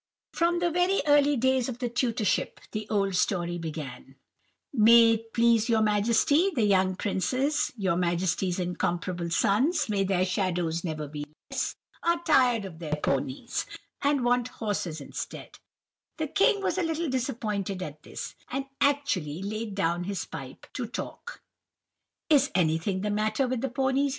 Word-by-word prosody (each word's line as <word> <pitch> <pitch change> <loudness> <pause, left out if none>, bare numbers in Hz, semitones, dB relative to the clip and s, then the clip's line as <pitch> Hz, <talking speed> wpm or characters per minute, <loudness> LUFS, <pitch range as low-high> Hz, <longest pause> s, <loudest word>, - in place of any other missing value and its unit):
"From 345 +1 +2
very 355 +2 +2
early 290 -1 +4
days 260 +1 +2
of 240 - -5
the 250 -1 -2
tutorship, 235 -3 0
the 215 0 -5
old 195 -2 +1
story 175 -2 0
began:— 150 -5 -7 0.6
"'May 230 -1 +7
it 225 0 -2
please 230 -1 +3
your 220 -1 +3
Majesty, 230 - +3
the 235 - +2
young 190 -2 +3
princes, 255 +10 0
your 190 -4 +1
Majesty's 175 +1 0
incomparable 175 -1 -2
sons—may 215 - +2
their 185 -1 +2
shadows 180 -3 -1
never 155 -3 -3
be 145 0 -6 0.3
less!—are 340 0 -2
tired 250 - +3
of 165 -4 -9
their 155 -3 -2
ponies, 135 -3 -2 0.3
and 280 -3 +2
want 245 0 +2
horses 200 -10 -3
instead.' 140 - -7 0.6
"The 315 -3 -2
king 405 +3 +3
was 380 - 0
a - - +1
little 325 0 -1
disappointed 215 -8 -2
at 150 -2 -8
this, - - -7 0.2
and 270 +2 -2 0.2
actually 195 - +1
laid 215 0 -4
down 175 -2 0
his 200 0 -3
pipe - - -9
to - - -3
talk. 485 - -7 0.8
"'Is 285 -3 +4
anything 175 +2 +1
the 210 +1 -1
matter 215 +6 +1
with 250 -2 -2
the 270 - -1
ponies? 265 +3 +1
215 Hz, 145 wpm, -27 LUFS, 180-265 Hz, 0.8 s, May